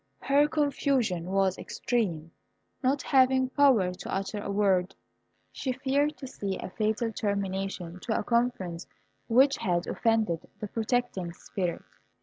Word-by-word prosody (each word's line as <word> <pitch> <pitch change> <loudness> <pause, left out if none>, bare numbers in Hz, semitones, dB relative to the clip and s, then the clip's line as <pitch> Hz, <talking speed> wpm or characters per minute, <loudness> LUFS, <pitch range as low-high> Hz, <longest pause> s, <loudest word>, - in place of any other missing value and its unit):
Her 285 +2 +4
confusion 275 - 0
was 190 -1 +1
extreme. 170 -10 -2 0.5
Not 270 0 +1
having 260 -1 +4
power 255 -11 +4
to - - -8
utter 195 +2 -2
a 200 - -5
word, 195 -3 +2 0.6
she 260 - -3
feared 280 +3 0
to - - -8
see 200 -7 -4
a - - -7
fatal 220 +2 -1
termination 195 -3 -3
to 220 +4 -1
a - - -1
conference 235 -8 -1 0.4
which 270 +4 +5
had 175 -1 0
offended 220 -8 0
the 210 - -5
protecting 220 -6 -1
spirit. 180 -1 -4
215 Hz, 135 wpm, -28 LUFS, 185-260 Hz, 0.6 s, which